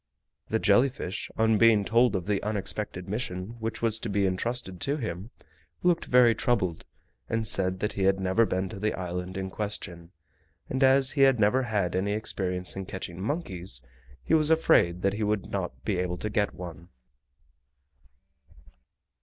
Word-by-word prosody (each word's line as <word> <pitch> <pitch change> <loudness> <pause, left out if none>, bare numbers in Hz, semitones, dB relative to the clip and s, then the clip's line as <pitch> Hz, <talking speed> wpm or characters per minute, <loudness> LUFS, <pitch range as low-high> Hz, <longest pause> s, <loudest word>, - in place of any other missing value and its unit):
The 110 - +1
jelly 110 +5 +4
fish, 105 -6 -6
on 110 -1 +3
being 110 -3 +5
told 120 +2 +3
of 90 -2 -2
the 100 -1 0
unexpected 105 -3 -3
mission 105 0 -4
which 115 +1 -4
was 115 -1 +3
to 115 - -4
be 100 0 +1
intrusted 95 0 -2
to 140 +2 0
him, 105 - -5 0.5
looked 175 -1 +2
very 125 -2 +5
troubled, 100 -7 -1 0.4
and 115 -1 -1
said 95 -2 +2
that 105 - -1
he 95 - -1
had 95 0 +3
never 95 +4 +2
been 95 +1 -1
to 100 - -8
the 105 +1 -1
island 90 0 -5
in 95 0 -4
question, 90 -5 -5 0.6
and 130 +1 0
as 135 0 +5
he 145 - 0
had 135 -3 +5
never 110 +5 +3
had 105 -8 -1
any 100 +2 0
experience 90 -4 -2
in 95 -1 -5
catching 95 -1 -6
monkeys 95 - -4 0.4
he - - -1
was 155 -1 +4
afraid 90 - +3
that 100 0 +2
he 105 - -4
would 105 -1 -1
not 65 0 -4
be 95 -4 0
able 90 -1 -2
to 105 - -4
get 105 -2 0
one. 85 0 -9
105 Hz, 170 wpm, -27 LUFS, 95-115 Hz, 0.6 s, being